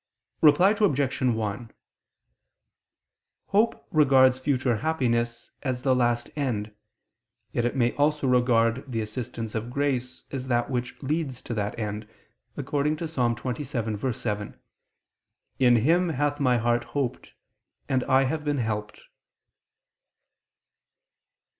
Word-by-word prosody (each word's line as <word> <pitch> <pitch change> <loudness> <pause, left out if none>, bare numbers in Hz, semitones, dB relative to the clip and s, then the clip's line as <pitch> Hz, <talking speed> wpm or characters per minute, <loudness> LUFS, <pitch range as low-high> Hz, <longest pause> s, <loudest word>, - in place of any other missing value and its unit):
Reply 165 +6 +6
Obj. 140 -11 +1
1: 110 -2 -1 1.8
Hope 215 +3 +1
regards 130 -4 +5
future 130 -3 +1
happiness 120 -4 -1
as 130 -2 -3
the 130 - +3
last 120 -1 +1
end: 110 -8 -2 0.8
yet 120 - 0
it 120 - -1
may 120 -2 +2
also 150 0 +2
regard 125 -1 +3
the 115 -2 -1
assistance 110 0 -5
of 115 +1 -3
grace 130 -2 -2
as 130 -2 -4
that 120 +1 0
which 125 -1 -3
leads 140 -3 -2
to - - -5
that 105 -1 -3
end, 105 -1 -4 0.5
according 145 +2 0
to 165 - -4
Ps. 160 -1 -9
27:7: 115 -3 -2 1.0
"In 125 -2 +5
Him 165 +10 +3
hath 145 0 -1
my 125 -3 +3
heart 120 +1 +1
hoped, 135 -4 -3 0.5
and 130 -1 +1
I 130 0 +4
have 150 +3 -2
been 145 -1 0
helped." 105 -3 -3
125 Hz, 115 wpm, -26 LUFS, 115-140 Hz, 1.8 s, Reply